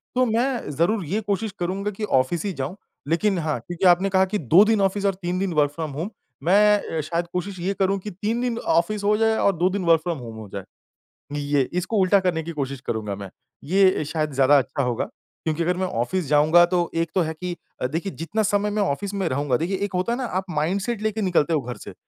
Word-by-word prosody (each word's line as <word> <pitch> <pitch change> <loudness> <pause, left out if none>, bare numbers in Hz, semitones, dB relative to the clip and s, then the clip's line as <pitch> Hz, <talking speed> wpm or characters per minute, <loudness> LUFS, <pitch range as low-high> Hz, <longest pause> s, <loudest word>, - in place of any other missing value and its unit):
तो 255 0 +4
मैं 240 - 0
ज़रूर 170 +7 +1
ये 205 +8 -1
कोशिश 205 +1 -2
करूँगा 195 +4 -2
कि 210 +2 -7
ऑफिस 165 +1 +1
ही 195 - -1
जाऊँ। 140 +4 -4 0.3
लेकिन 185 +4 +1
हाँ, 155 -6 -1
क्योंकि 175 +9 -4
आपने 180 +3 +4
कहा 190 0 +3
कि 200 +2 -2
2 165 - +5
दिन 220 -2 +2
ऑफिस 195 +1 0
और 195 - +3
3 175 +1 -2
दिन 190 -2 -1
वर्क 145 -2 +2
फ्रॉम 155 -1 -5
होम 160 +9 -4 0.3
मैं 210 +4 +5 0.2
अ, - - +1
शायद 170 +3 -2
कोशिश 185 +1 -3
ये 190 +3 -1
करूँ 195 +1 +2
कि 210 +2 -7
3 215 +6 -2
दिन 245 -2 -1
ऑफिस 205 +1 0
हो 210 +1 +3
जाए 225 0 +3
और 200 - +2
2 180 +2 +3
दिन 195 -1 -2
वर्क 165 -1 +5
फ्रॉम 170 -2 -2
होम 115 -2 -8
हो 110 -2 -8
जाए। 100 -1 -5 0.7
हुँ, 145 - -3
ये 145 -1 +1
इसको 185 +5 -1
उल्टा 190 +1 +4
करने 175 -4 0
की 170 - -5
कोशिश 140 -4 -4
करूँगा 105 -3 -2
मैं। 100 -1 -8 0.3
ये 185 +1 +3
शायद 155 0 -2
ज़्यादा 140 +2 +5
अच्छा 140 +1 0
होगा, 120 -2 -1 0.4
क्योंकि 160 +1 -1
अगर 180 +1 0
मैं 185 - 0
ऑफिस 170 +8 -1
जाऊँगा 155 +4 +5
तो 175 -1 0
एक 165 0 0
तो 185 - +4
है 160 0 -1
कि 180 +2 -5 0.3
अ, - - +1
देखिए 165 +7 -3
जितना 210 +7 -1
समय 205 0 +1
मैं 210 0 -1
ऑफिस 195 +3 -1
में 195 -3 -1
रहूँगा 130 -2 0
देखिए 185 +4 -1
एक 205 - -8
होता 185 +6 0
है - - -2
ना 260 - -2
आप 190 -4 -2
माइंडसेट 190 +8 -1
लेके 215 0 -1
निकलते 170 -4 +2
हो 150 - +2
घर 125 0 -6
से। - - -10
180 Hz, 240 wpm, -23 LUFS, 155-200 Hz, 0.7 s, 2